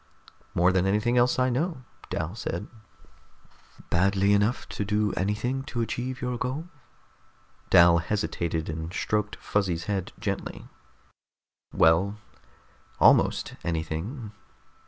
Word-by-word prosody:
"More 90 +2 +4
than 95 0 +2
anything 105 +5 +1
else 125 0 +3
I 130 0 +2
know," 150 +1 -2 0.3
Dal 80 +3 -3
said. 105 -4 -4 1.3
"Badly 100 +3 +3
enough 105 +5 +1
to - - -3
do 105 0 0
anything 105 +7 -1
to 120 - -4
achieve 125 +4 -3
your 125 -1 -2
goal?" 135 +7 -3 1.0
Dal 85 0 +7
hesitated, 85 -4 -2
and 80 +1 -4
stroked 105 +2 -1
Fuzzy's 90 -5 -1
head 100 -2 -2
gently. - - -4 1.0
"Well... 95 +6 +3 0.8
almost - - +4
anything." 85 - -3
105 Hz, 110 wpm, -27 LUFS, 85-120 Hz, 1.3 s, Dal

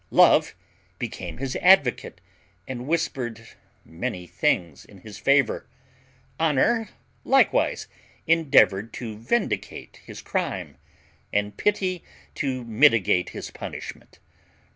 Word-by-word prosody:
Love - - +5 0.4
became - - -6
his 130 0 -4
advocate, 180 -9 +3 0.5
and 125 -1 -6
whispered 125 -8 -2 0.4
many 90 +2 -5
things 80 -4 -1
in 100 - -17
his 105 0 -11
favour. 140 -3 +2 0.7
Honour 165 - +2 0.3
likewise 270 +1 +2 0.4
endeavoured 115 - +3
to 110 -2 -6
vindicate 200 - -3
his - - -10
crime, - - -3 0.5
and 105 0 -1
Pity 190 -4 -1 0.3
to 130 -3 -3
mitigate 110 -6 +3
his - - -8
punishment. - - -9
125 Hz, 100 wpm, -24 LUFS, 105-165 Hz, 0.7 s, Love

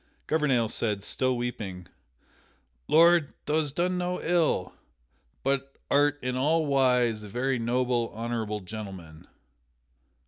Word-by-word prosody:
Gouvernail 135 -7 +2
said, 105 -3 -1
still 130 +3 -1
weeping: 105 -7 -5 1.0
"Lord, 170 -1 +5
thou 150 +1 +1
hast 145 -2 -3
done 180 +1 0
no 180 0 -2
ill, 165 - +1 0.7
but 135 0 -1
art 145 0 +3
in 125 0 -1
all 155 +5 +2
wise 125 -5 +2
a 105 - -9
very 125 +4 -1
noble, 120 0 0
honorable 110 -2 -3
gentleman." 95 -6 -9
125 Hz, 115 wpm, -27 LUFS, 110-145 Hz, 1.0 s, Lord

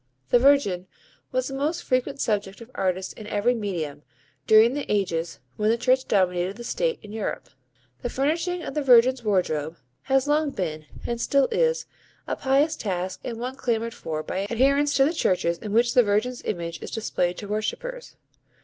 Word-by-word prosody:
The 245 - +6
Virgin 235 -10 +3 0.4
was 255 0 0
the 270 - -6
most 305 +6 -1
frequent 255 +2 0
subject 205 -4 -1
of 230 +1 -12
artists 185 0 -1
in 215 - -10
every 210 +4 +1
medium, 170 -10 -4 0.5
during 220 +3 +6
the 290 0 -3
ages 175 -5 -1 0.2
when 215 0 +1
the 230 - +3
Church 255 +2 +2
dominated 185 -1 +1
the 240 - -8
State 485 - -1
in 210 - -10
Europe. 220 -1 -4 0.5
The 245 - -2
refurnishing 330 +7 -1
of - - -5
the 300 - 0
Virgin's 255 -1 +5
wardrobe 170 -6 0 0.3
has 270 0 +2
long 300 0 +2
been 155 - -4 0.2
and 235 -1 -2
still 275 +1 +3
is, 485 -1 +1 0.4
a - - -2
pious 275 +4 +2
task 185 -2 -3
and 230 -2 -5
one 250 +2 -4
clamoured 230 -3 -1
for 155 -6 -4
by 195 +4 -3
adherents 280 +5 +2
to 270 - +5
the 315 - +1
churches 175 - +1
in 210 - -6
which 235 +2 +3
the 250 - +7
Virgin's 220 +3 0
image 170 -3 -4
is - - -6
displayed 180 -5 -1
to 205 - -7
worshippers. 475 - -4
230 Hz, 180 wpm, -25 LUFS, 190-270 Hz, 0.5 s, the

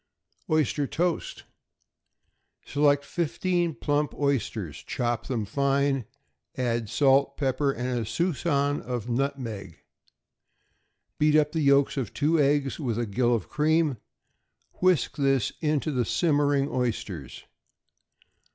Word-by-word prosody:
=Oyster 155 -2 +1
Toast.= 175 +3 -2 1.2
Select 145 0 +2
fifteen 175 0 -1
plump 145 0 -1
oysters; 115 - -1
chop 120 -3 -2
them 115 -5 -2
fine, 140 +2 +1 0.5
and 125 - -1
add 110 - -10
salt, 140 +1 +3
pepper, 135 0 +1
and 125 -1 -2
a - - -2
suspicion 145 - 0
of 125 -2 -4
nutmeg. 115 - -3 1.4
Beat 150 0 +4
up 150 -1 +3
the 160 - -1
yolks 140 0 +3
of 125 -7 -3
two 155 +2 +2
eggs 140 0 +1
with 120 -7 -2
a 120 - 0
gill 120 +3 +1
of 115 - -4
cream; 155 -2 +1 0.8
whisk 185 -4 +2
this 135 -5 +2
into 155 -1 0
the 125 -3 +1
simmering 145 -1 +2
oysters. 110 - -3
140 Hz, 115 wpm, -26 LUFS, 125-150 Hz, 1.4 s, Beat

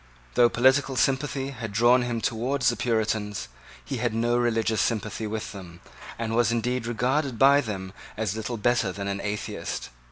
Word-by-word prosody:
Though 120 -1 +5
political 130 +3 +3
sympathy 135 +1 0
had 115 -5 -6
drawn 120 +4 +4
him 120 -2 -2
towards 125 +4 +1
the 120 - -1
Puritans, 110 -3 -1 0.4
he 135 - -3
had 120 -1 -1
no 120 +1 +1
religious 115 -3 +1
sympathy 110 -1 -1
with 110 0 -4
them, 90 -4 -10 0.4
and 115 -1 -2
was 115 -1 +3
indeed 120 +1 -1
regarded 125 +3 0
by 140 +3 +6
them 95 -5 -5 0.2
as 105 -2 -1
little 110 +2 -4
better 115 -2 +1
than 100 +1 -5
an 100 0 -2
atheist. 105 -9 -4
115 Hz, 165 wpm, -26 LUFS, 110-125 Hz, 0.4 s, by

